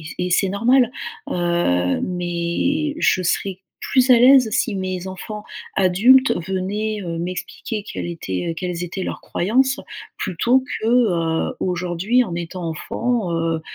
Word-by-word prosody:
et 155 - -11
c 155 - -8
et 180 0 -1
c'est 190 +2 +2
normal. 245 +5 +3 0.4
Heu, 170 - +1
mais 180 - -1
je 185 - +2
serai 190 +2 -1 0.3
plus 260 -1 +4
à 240 - +8
l'aise 255 -1 +7
si 210 - 0
mes 185 -1 -3
enfants 210 +3 -7 0.3
adultes 215 +8 +5 0.2
venaient, 205 +3 -2
heu, 170 -2 -4
m'expliquer 185 +4 -5
quelle - - -4
était 160 - -3
quelles 180 -1 -3
étaient 180 +2 -4
leurs - - -4
croyances, 260 +8 +1 0.4
plutôt 245 +9 +1 0.2
que, 220 - -2
heu, 175 -10 +1
aujourd'hui 180 +7 +1
en 175 -5 -5
étant 175 +1 -5
enfants, 225 +5 -2
heu 165 -1 0
185 Hz, 145 wpm, -21 LUFS, 175-230 Hz, 0.4 s, à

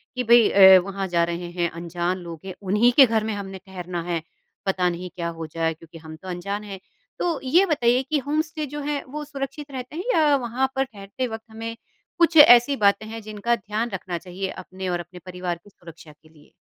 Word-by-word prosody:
कि, 250 - -1
"भई 235 -1 +6
अ, 190 -1 +9
वहाँ 195 0 -4
जा 170 -2 +2
रहे 170 +1 -4
हैं, 175 -1 -1
अनजान 175 +2 -3
लोग 170 -2 -8
हैं। 190 - -6
उन्हीं 210 +5 +3
के 275 - +10
घर 225 -2 0
में 220 0 -2
हमने 195 -1 -6
ठहरना 180 -2 -5
है, 170 -1 -2 0.4
पता 185 -2 +1
नहीं 175 +1 -5
क्या 170 -2 -3
हो 165 - -5
जाए? 165 +1 -1
क्योंकि 165 +1 -15
हम 160 -1 -10
तो 185 +4 -13
अनजान 200 +4 -4
हैं।" 200 -2 -8 0.4
तो 335 -4 0
ये 335 +9 +4
बताइए 250 -7 +2
कि 310 - +2
होम 305 +2 +2
स्टे 310 -1 -5
जो 295 +1 -7
है, 290 0 -2
वो 300 +3 -6
सुरक्षित 280 0 -6
रहते 255 +1 -7
हैं 350 - -4
या 305 -4 +4
वहाँ 260 +1 -1
पर 265 - +2
ठहरते 215 +1 -6
वक़्त 225 -1 -7
हमें 225 +1 -6 0.4
कुछ 335 -1 +3
ऐसी 245 -1 +8
बातें 205 -2 +2
हैं 225 +1 -7
जिनका 215 +2 -1
ध्यान 215 +2 -3
रखना 185 -3 -4
चाहिए 185 +2 -5
अपने 185 0 -7
और 175 -1 -1
अपने 175 +1 -10
परिवार 180 -1 -4
की - - -17
सुरक्षा 165 -4 -14
के 150 +1 -23
लिए? 150 -2 -22
200 Hz, 220 wpm, -23 LUFS, 175-250 Hz, 0.4 s, के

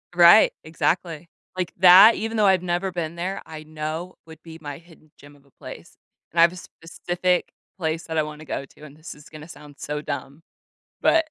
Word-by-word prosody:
Right, 175 +4 +7
exactly. 165 0 -3 0.3
Like 180 -2 -3
that, 190 +5 +8
even 225 +1 -4
though 210 - +3
I've 190 -2 +3
never 180 +2 -2
been 170 -2 -5
there, 180 +3 -4
I 155 -1 -10
know 155 +3 -6
would 160 0 -15
be 165 -1 -11
my 145 -2 -7
hidden 165 -2 -21
gem 145 0 -17
of 140 -1 -25
a 140 - -28
place. - - -13 0.3
And 170 - -3
I - - +7
have 170 +1 +4
a - - -11
specific 180 +1 -3 0.3
place 160 -1 -3
that 160 -1 -5
I 155 - +2
wanna 150 0 -9
go 140 - -5
to, 140 - -23
and 145 -1 -13
this 155 +2 -11
is 150 - -17
gonna 155 0 -12
sound 145 -3 -14
so 150 0 -5
dumb, 145 +1 -7 0.6
but 325 -1 +3
165 Hz, 205 wpm, -23 LUFS, 155-180 Hz, 0.6 s, that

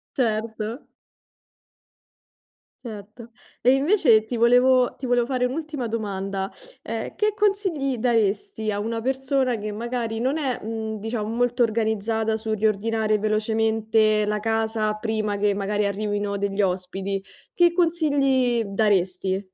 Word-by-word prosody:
Certo. 220 0 -2 2.0
Certo. 220 +1 -9 0.3
E 250 - +5
invece 270 - +4
ti 235 +2 -4
volevo 250 +2 +4
ti 260 - -9
volevo 245 -1 +2
fare 255 -2 0
un'ultima 290 0 -3
domanda. 195 -3 -3 0.3
Eh, - - -5
che 425 -1 +1
consigli 380 - 0
daresti 220 - 0
a 205 - -2
una 225 +2 -3
persona 265 -1 0
che 210 0 -4
magari 230 +1 -3
non 265 +6 0
è, 270 -5 -1
mhmm, 220 -1 -4
diciamo 220 0 -3
molto 245 +2 +1
organizzata 220 0 0
sul 220 0 -2
riordinare 215 +1 +1
velocemente 220 0 +1
la 210 0 -1
casa 220 -1 0
prima 215 -1 -2
che 205 0 +2
magari 205 +1 -1
arrivino 205 0 -2
degli 200 0 0
ospiti, 190 +1 -2 0.3
che 345 -1 +4
consigli 280 -8 +2
daresti? 195 -2 0
220 Hz, 125 wpm, -24 LUFS, 210-250 Hz, 2.0 s, E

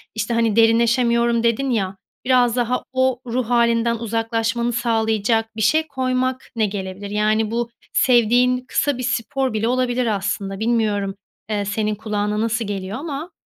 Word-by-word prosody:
işte, 220 +2 -2
hani, 230 -2 +1
derinleşemiyorum 235 +1 +3
dedin, 235 +4 +1
ya, 195 -4 -1 0.3
biraz 245 -2 +3
daha 245 0 0
o 260 -1 +1
ruh 245 0 -2
hâlinden 235 -1 +2
uzaklaşmanı 230 +1 -1
sağlayacak 225 -1 0
bir 220 - -4
şey 315 +8 +3
koymak 255 -1 -2
ne 220 -2 +2
gelebilir? 195 0 -5
Yani, 215 +1 +1
bu 235 0 -1 0.2
sevdiğin 250 +1 +3
kısa 285 -3 0
bir 255 - -4
spor 260 +1 -1
bile 220 +1 0
olabilir 250 0 0
aslında. 195 0 -3
Bilmiyorum, 215 -4 0 0.3
eee, 205 -1 -1
senin 210 +1 -1
kulağına 210 0 -2
nasıl 230 0 -1
geliyor 195 +1 -4
ama 310 +3 -5
230 Hz, 145 wpm, -21 LUFS, 215-250 Hz, 0.3 s, derinleşemiyorum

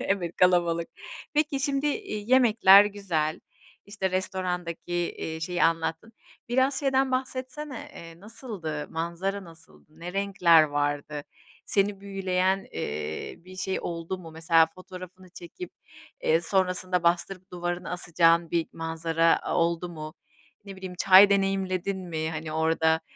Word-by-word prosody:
Evet, 180 -4 -2
kalabalık. 170 -2 +3 0.5
Peki, 295 -2 +1
şimdi, 280 0 0
iii, 280 - -3
yemekler 220 -6 +7
güzel, 180 -7 -2 0.5
işte, 200 -2 -2
restorandaki, 180 -2 -3 0.3
iii, 160 0 -5
şeyi 175 +2 -2
anlattın. 165 +6 -1 0.4
Biraz 260 +3 +2
şeyden 270 -1 +2
bahsetsene, 260 +1 -4
eee, 165 +1 -11
nasıldı? 200 - -6
Manzara 175 +4 -3
nasıldı? 165 -1 -18
Ne 175 +1 -6
renkler 195 -5 +4
vardı? 145 0 -2 0.4
Seni 200 0 +1
büyüleyen, 190 -1 0
eee, 75 +1 -4
bir 185 +2 -14
şey 190 0 -2
oldu 170 +2 -4
mu, 165 -3 -11
mesela 165 0 +4
fotoğrafını 185 0 -11
çekip, 185 - -9 0.5
eee, 160 +1 +3
sonrasında 185 0 0
bastırıp 175 +2 0
duvarını 175 0 -4
asacağın 170 -1 +2
bir 170 -1 0
manzara 165 0 +1
a - - -3
oldu 170 +1 0
mu, 155 -2 -8 0.5
ne 195 -1 -9
bileyim 185 -1 -7
çay 195 +1 +8
deneyimledin 195 -1 0
mi? 160 -1 -2
Hani, 155 0 -5
orda 160 0 +2
180 Hz, 125 wpm, -27 LUFS, 165-195 Hz, 0.5 s, çay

